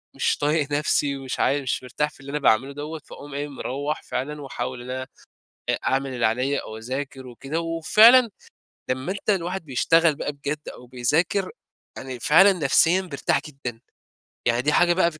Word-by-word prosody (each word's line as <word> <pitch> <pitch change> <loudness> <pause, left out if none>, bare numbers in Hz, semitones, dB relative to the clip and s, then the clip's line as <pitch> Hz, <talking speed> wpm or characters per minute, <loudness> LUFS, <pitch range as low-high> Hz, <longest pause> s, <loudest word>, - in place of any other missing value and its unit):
مش - - +1
طايق 150 0 0
نفسي 145 -1 +1
ومش 135 -1 -5
عا 145 +1 +2
مش 130 -1 -2
مرتاح 150 +4 -1
في 150 - -20
اللي 135 +1 -11
أنا 150 - -1
باعملُه 135 0 +3
دوَّة، 150 +2 -6
فاقوم 145 0 -11
إيه 145 +1 -3
مروَّح 145 +2 -4
فعلًا 150 +3 -4
وأحاول 125 -2 -5
إن 125 - -10
أنا 130 0 -4 0.6
أ - - +3
أعمل 135 0 0
اللي 120 -2 0
عليَّا 125 +6 0
أو 110 - -8
أذاكر 130 +3 -5
وكده، 135 +6 -4
وفعلًا 215 +9 +6 0.6
لمَّا 130 +6 -2
أنت 200 +2 -5
الواحد 185 -2 0
بيشتغل 160 +4 +3
بقى 145 - -3
بجد 145 +1 -5
أو 125 - -12
بيذاكر، 150 +10 0 0.5
يعني 130 -2 -7
فعلًا 185 +10 +6
نفسيًا 170 +2 +3
بيرتاح 145 -6 -1
جدًا، 125 -5 -7 0.7
يعني 120 +1 +2
دي 150 +3 +1
حاجة 175 +1 +4
بقى 170 -1 +2
145 Hz, 175 wpm, -24 LUFS, 130-160 Hz, 0.7 s, وفعلًا